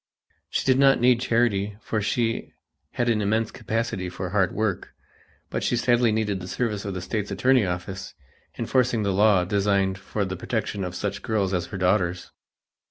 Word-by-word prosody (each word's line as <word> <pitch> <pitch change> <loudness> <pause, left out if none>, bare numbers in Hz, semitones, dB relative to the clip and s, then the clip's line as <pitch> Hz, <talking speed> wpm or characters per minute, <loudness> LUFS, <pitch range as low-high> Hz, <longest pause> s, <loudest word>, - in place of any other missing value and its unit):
She - - -1
did 130 0 +4
not 135 -1 +5
need 125 0 +4
charity 105 -5 +1
for 110 -1 -2
she 115 +2 -1 0.4
had 120 - 0
an 110 -3 +2
immense 110 +2 0
capacity 115 -5 -2
for 90 0 -5
hard 95 -3 +2
work, 105 -3 -2 0.6
but - - -2
she - - +1
sadly 120 -1 +3
needed 105 -3 0
the 90 - -8
service 105 -1 -2
of 100 -2 -4
the 90 - -4
State's 105 +2 -3
attorney 110 +3 +3
office, 90 +2 -5 0.4
enforcing 125 -4 +1
the 100 -1 0
laws 100 -2 +4
designed 100 -1 +1
for 100 +1 -3
the 95 0 -4
protection 105 +1 -3
of 90 -1 -5
such - - -3
girls 100 -4 0
as 90 -2 -1
her 100 - -6
daughters. 90 -1 0
105 Hz, 175 wpm, -25 LUFS, 95-115 Hz, 0.6 s, not